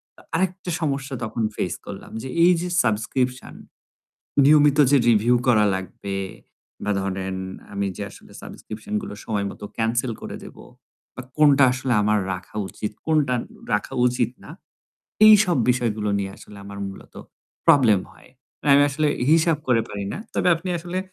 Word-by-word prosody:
তো - - -18
আরেকটা 185 +1 -1
সমস্যা 140 -2 -2
তখন 110 +1 -3
ফেস 90 - -2
করলাম - - -9
যে 130 - -7
এই 175 - +7
যে 180 - -3 0.2
সাবস্ক্রিপশন 125 +3 -1 0.9
নিয়মিত 145 0 +5
যে 145 - +6
রিভিউ 115 +2 +4
করা 110 -4 +5
লাগবে 95 +1 -6 0.7
বা 105 - 0
ধরেন 95 -1 -3 0.4
আমি 100 0 -1
যে 100 - -4
আসলে - - -16
সাবস্ক্রিপশন 110 - -9
গুলো 195 - -7
সময় 100 -2 -1
মতো 105 - -9
ক্যানসেল 115 +2 0
করে - - -6
দেব - - -12 0.6
বা - - -6 0.2
কোনটা 145 -2 +6
আসলে 130 -1 -1
আমার 105 0 +2
রাখা 90 +3 -9
উচিত, 105 - -5
কোনটা 150 -5 +2 0.4
রাখা 105 +5 -1
উচিত 120 -2 0
না - - -12 0.8
এইসব 210 -6 +6
বিষয়গুলো 110 -4 -1
নিয়ে 95 -1 -3
আসলে 105 - -14
আমার 100 0 -9
মূলত 95 - -12 0.5
প্রবলেম 115 -9 +5
হয়। - - -20 0.3
না - - -8
আমি 140 - +6
আসলে 150 +2 0 0.2
হি 150 - +4
হিসাব 160 -2 +1
করে 115 -3 +3
পারি 100 -1 -5
না। - - -5 0.2
তবে - - +2
আপনি 175 +3 -7
আসলে 175 +2 -4
125 Hz, 160 wpm, -23 LUFS, 105-150 Hz, 0.9 s, এই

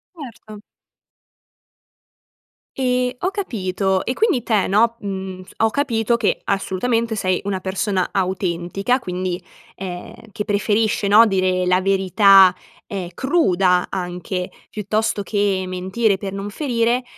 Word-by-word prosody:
Certo. 225 -7 -11 2.2
Ehm, 250 -1 +1
ho 370 - 0
capito, 195 - -1
e 250 - -2
quindi 390 - +1
te, 215 -5 +1
no, 230 +4 +3
uhm, 190 -2 -5
ho 225 - +3
capito 235 -3 0
che - - 0
assolutamente 225 +4 -1
sei 185 -3 0
una 195 -2 -2
persona 190 0 -1
autentica 185 +3 -1
quindi, 180 -5 -3 0.4
ehm, 190 +4 -8
che 210 -1 -4
preferisce, 210 0 +1
no, 220 +3 +7
dire 185 -2 +1
la 185 +1 +3
verità, 195 0 +5 0.3
ehm, 185 -4 -5
cruda 190 - +2
anche, 180 0 -4 0.2
piuttosto 215 0 -1
che 200 -2 0
mentire 190 +3 0
per 195 0 -6
non 195 +1 -5
ferire, 240 -1 0
200 Hz, 120 wpm, -20 LUFS, 185-230 Hz, 2.2 s, no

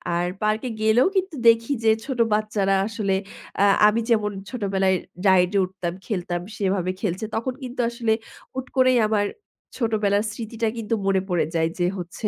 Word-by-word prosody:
আর 175 +1 0
পার্কে 215 +3 0
গেলেও 220 +6 +4
কিন্তু 375 -3 0
দেখি 230 +4 +5
যে 220 - +5
ছোট 265 -4 -4
বাচ্চারা 210 -2 +1
আসলে 205 -3 -1 0.4
অ্যা 200 - +4 0.2
আমি 210 +2 +2
যেমন 215 -3 +2 0.2
ছোটবেলায় 195 -5 +1 0.3
রাইডে 185 +1 +4
উঠতাম, 185 -2 -5
খেলতাম 175 -5 -2 0.2
সেভাবে 190 -2 0
খেলছে। 190 +1 -2
তখন 245 +3 -2
কিন্তু 250 0 -7
আসলে 235 -1 -1 0.4
হুট 260 0 -4
করেই 255 -1 +5
আমার 210 -1 +1 0.5
ছোটবেলার 210 -3 +1
স্মৃতিটা 225 +1 -3
কিন্তু 230 0 -3
মনে 190 -1 +3
পড়ে 175 -2 +1
যায়। 160 0 +2
যে 175 - +2
হচ্ছে 180 +4 -4
210 Hz, 155 wpm, -23 LUFS, 190-230 Hz, 0.5 s, দেখি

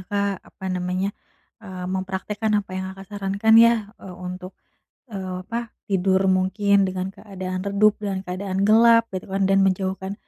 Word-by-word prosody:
Kak, 200 -1 -1
apa 190 - -15
namanya, 185 +2 -2 0.5
eee, 185 -4 -8
mempraktekkan 190 +3 -3 0.2
apa - - -19
yang 185 0 -3
Kakak 195 - -10
sarankan 200 +2 +2
ya, 230 -3 +3
eee, 185 -2 -9
untuk, 185 +1 -7 0.5
eee, 185 -3 -5
apa, 230 +3 -5 0.2
tidur 190 0 +2
mungkin 195 +2 +2
dengan 185 0 -3
keadaan 185 -2 -6
redup, 205 +1 +3
dengan 195 -2 -3
keadaan 190 +1 -3
gelap, 230 +2 +5
gitu 185 -1 -5
kan. 195 - +1
Dan 195 - +4
menjauhkan, 190 +1 -2
195 Hz, 150 wpm, -23 LUFS, 185-205 Hz, 0.5 s, gelap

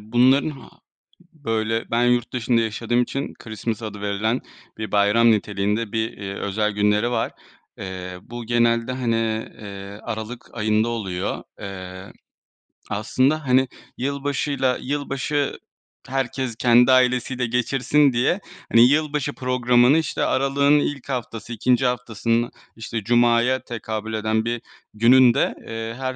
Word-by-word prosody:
bunların 125 +6 +3
ha 140 - -11 0.6
böyle, 115 -6 -2
ben 120 +1 +2
yurt 120 -1 +1
dışında 120 -1 +1
yaşadığım 115 +2 0
için 135 +3 -4
Christmas 110 0 -5
adı 105 -2 -6
verilen 105 +4 -1 0.4
bir 110 -2 -5
bayram 105 +3 +4
niteliğinde 105 +1 0
bir, 110 0 -1
eee, 100 -1 -6
özel 105 +2 -1
günleri 105 +3 +2
var. 125 - -1 0.5
Eee, 90 -1 -6
bu 120 +2 -8
genelde, 115 +1 +2
hani, 125 -3 0 0.4
eee, 100 0 -9
aralık 110 +2 -6
ayında 110 0 +1
oluyor. 100 -6 -3 0.2
Eee, 95 -1 -8 0.8
aslında, 130 +8 0
hani, 130 +1 +4 0.3
yılbaşıyla, 140 -1 -1
yılbaşı 145 +1 -2 0.5
herkes 130 -2 -2
kendi 120 +2 +5
ailesiyle 125 0 +2
geçirsin 125 +4 +2
diye, 125 +10 +1 0.3
hani, 115 +1 +7
yılbaşı 150 0 0
programını, 125 +1 +3
işte, 160 -2 -1
aralığın 140 +2 +3
ilk 145 -2 -3
haftası, 120 -3 -4
2. 125 +3 +2
haftasının, 120 -1 0 0.2
işte, 115 0 -5
cumaya 120 +2 +3
tekabül 110 -1 -5
eden 110 0 0
bir 120 0 -2 0.3
gününde, 120 +3 +5
eee, 115 0 -5
her 130 -1 -3
120 Hz, 125 wpm, -22 LUFS, 110-130 Hz, 0.8 s, hani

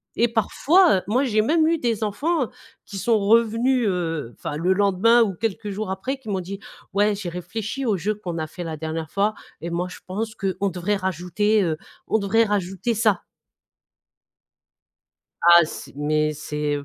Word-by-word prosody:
Et 235 - +3
parfois, 300 - +3
heu, - - -2
moi, 245 +6 +2
j'ai 215 -4 +2
même 315 +8 +3
eu 330 +1 +2
des 230 -4 -1
enfants 260 +7 0 0.4
qui 200 - -8
sont 225 +4 +2
revenus, 230 +4 +3
heu, 165 -9 -2
enfin - - -5
le 180 +4 +2
lendemain 205 +4 +4
ou 205 -4 -1
quelques 215 +2 -3
jours 210 +1 -4
après, 195 +9 -3
qui 255 -5 -11
m'ont 195 -2 0
dit: 195 +2 -7 0.3
«Ouais, 205 +1 +3
j'ai 195 -3 -5
réfléchi 205 +9 -4
au 215 -5 +1
jeu 200 +5 -1
qu'on 180 -5 -6
a 160 - -2
fait 175 +3 -7
la 160 -2 -5
dernière 160 +1 -4
fois 205 +2 +1 0.3
et 170 - -4
moi 175 +2 -1
je - - -10
pense 215 +4 -4
qu'on 195 0 -1
devrait 185 +3 -1
rajouter, 190 +3 0
heu, 160 -3 -1 0.3
on 220 - +2
devrait 210 +3 +3
rajouter 195 +1 -1
ça». 215 -4 +2 2.2
Ah 170 0 +8
c'est 155 - -9
mais 155 +1 +1
c'est, 150 0 -3
heu, 145 - -6
200 Hz, 180 wpm, -23 LUFS, 175-225 Hz, 2.2 s, Ah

